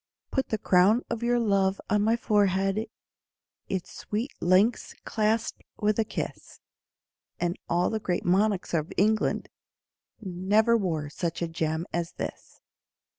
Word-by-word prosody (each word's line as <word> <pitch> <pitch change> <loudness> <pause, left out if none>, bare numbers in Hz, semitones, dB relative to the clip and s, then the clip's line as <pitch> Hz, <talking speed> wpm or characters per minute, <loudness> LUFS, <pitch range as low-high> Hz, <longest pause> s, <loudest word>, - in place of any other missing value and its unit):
Put 265 - -1
the 220 - 0
crown 200 +6 +4
of 230 - -2
your 240 +1 +2
love 195 -4 +2
on 210 -1 +2
my 220 +2 +3
forehead, 200 -2 +1 0.8
Its 190 -2 -3
sweet 220 +6 -3
links 190 +7 +2
clasped 220 +1 0 0.2
with 210 0 +1
a - - +4
kiss, - - -6 0.8
And 175 0 0
all 175 +1 +2
the 220 - -1
great 180 -4 -2
monarchs 195 +1 +2
of 155 -1 0
England 215 +2 +2 0.7
Never 205 +4 +2
wore 160 -9 -1
such 170 +1 -3
a - - 0
gem 160 0 -2
as 170 -1 -2
this. - - -7
200 Hz, 135 wpm, -27 LUFS, 175-220 Hz, 0.8 s, crown